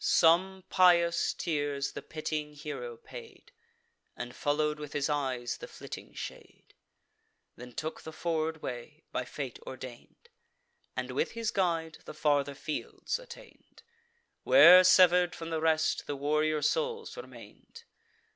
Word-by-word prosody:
Some 185 +3 +4
pious 170 -2 +4
tears 145 -4 -2
the - - -7
pitying 155 -1 -4
hero 140 -5 -6
paid, 455 - -12 0.7
And 120 0 -6
follow'd 150 +1 0
with 150 -1 -7
his 145 0 0
eyes 130 -4 -2
the - - -9
flitting - - -10
shade, - - -9 0.8
Then 125 0 -11
took 155 +5 -5
the 160 - -8
forward 160 -1 -2
way, 125 +6 -7
by 125 - -2
fate 130 -1 -6
ordain'd, 130 - -11 0.7
And, - - -3
with 460 - -1
his 230 -1 -2
guide, 165 -4 -1
the - - -9
farther 145 -2 +1
fields 155 - -4
attain'd, - - -15 0.6
Where, 185 - +9
sever'd 180 -1 +5
from 165 0 -7
the 160 -1 -1
rest, 160 -1 +1
the 145 - -2
warrior 150 +2 0
souls 470 -1 -1
remain'd. 470 -1 -12
155 Hz, 130 wpm, -30 LUFS, 145-180 Hz, 0.8 s, Where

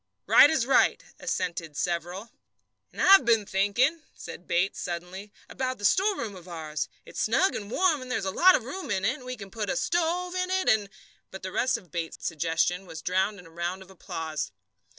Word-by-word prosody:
"Right - - +8
as 310 -7 +1
right," 270 - +3 0.2
assented 170 -4 -3
several. 175 +5 -3 0.6
"And - - -13
I've 390 -4 +8
been 225 -3 +3
thinking," 215 +12 +1
said 180 - -10
Bates 180 +3 0
suddenly, 180 +4 -6 0.2
"about 255 -1 -3
that 205 - -4
storeroom 370 - +1
of 180 -1 -13
ours. 155 -3 -4 0.2
It's - - -5
snug 265 - +2
and 205 -1 -5
warm, 320 +1 +2
and 255 - -9
there's 195 - -1
a 190 - -1
lot 370 - +6
of - - -1
room 280 +6 -6
in 195 -2 0
it, 240 +5 +1
and 255 - -14
we 255 0 -5
can 195 -2 -10
put 215 -2 -4
a 270 - 0
stove 345 +5 0
into 365 0 -1
it 375 - +1
and 210 -2 +2 0.2
" - - -34
But 190 - -10
the 185 - -4
rest 255 +4 +1
of 180 -8 -16
Bates's 165 -1 -5
suggestion 170 +3 0
was 160 -1 -9
drowned 190 +3 0
in 180 - -13
a 165 - -15
round 175 +3 -4
of 190 - -17
applause. 160 -4 -5
200 Hz, 210 wpm, -27 LUFS, 175-260 Hz, 0.6 s, Right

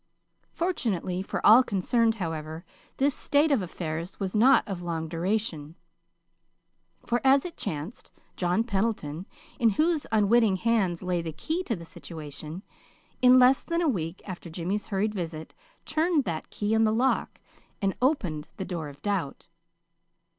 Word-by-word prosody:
Fortunately 205 - -1
for 195 - -4
all 225 +4 +9
concerned, 225 +1 +1
however, 160 -3 -5 0.3
this 280 +1 +2
state 290 +4 +2
of 270 -7 +3
affairs 170 0 -5
was 195 0 -3
not 250 +6 +5
of 190 -3 -4
long 165 -2 -3
duration; 165 -2 -2 1.3
for, 240 +1 0
as 270 +2 +5
it 345 - -6
chanced, 165 +2 -6 0.2
John 180 +4 +1
Pendleton, 195 -7 -2 0.3
in 235 -3 +5
whose 310 - +1
unwitting 220 -1 +4
hands 195 -5 0
lay 180 -1 0
the 165 -1 -5
key 320 - -3
to 230 - -1
the 170 -2 -9
situation, 155 +1 -8 0.6
in 250 0 +7
less 255 +1 +6
than 335 0 -1
a - - +2
week 175 - -2
after 180 -2 -7
Jimmy's 180 +5 -3
hurried 210 +1 0
visit, 165 -5 -5 0.3
turned 315 -1 +1
that 165 -6 -4
key 210 +1 -2
in 225 0 +4
the 215 - +3
lock, 250 +4 0 0.4
and 195 -2 0
opened 185 - 0
the 190 - -4
door 165 -5 -4
of 140 0 -15
doubt. 195 -9 -2
195 Hz, 150 wpm, -27 LUFS, 170-240 Hz, 1.3 s, all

